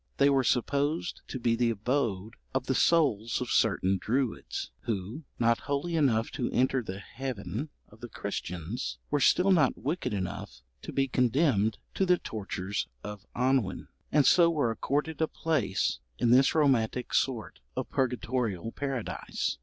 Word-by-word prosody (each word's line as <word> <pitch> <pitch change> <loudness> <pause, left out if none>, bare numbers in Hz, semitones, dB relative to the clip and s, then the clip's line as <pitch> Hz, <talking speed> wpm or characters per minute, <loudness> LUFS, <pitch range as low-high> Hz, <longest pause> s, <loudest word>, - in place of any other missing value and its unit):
They 140 0 +5
were 135 -1 +3
supposed 145 +7 0
to 130 - -5
be 115 -1 +2
the 120 0 +2
abode 115 -2 -1 0.2
of - - 0
the - - +1
souls 115 -10 +2
of 125 - -3
certain 95 -3 +2
Druids, 125 - -2
who, 115 - -3
not 115 0 +3
holy 145 +4 -1
enough 120 -8 +2
to 120 - -2
enter 130 +1 +2
the 95 -4 -6
heaven 125 +4 -5 0.2
of 110 +1 -19
the 120 - -7
Christians, 90 - -4
were - - +2
still 190 +2 +4
not 155 -8 +4
wicked 145 -2 -2
enough 95 - -5 0.2
to - - -7
be 135 0 +1
condemned 125 -4 +2 0.2
to 190 - +1
the 180 0 +5
tortures 100 - -4 0.2
of 105 -1 -8
annwn, 125 -7 0 0.2
and 145 -2 +4
so 170 -2 +6
were 145 -8 +1
accorded 145 +7 -2
a 160 - +3
place 130 - 0 0.2
in 120 - +2
this 135 +5 +5
romantic 125 -5 +2
sort 115 -9 0 0.2
of - - -2
purgatorial 120 -5 -1
paradise. 135 -5 -3
125 Hz, 155 wpm, -29 LUFS, 105-140 Hz, 0.2 s, so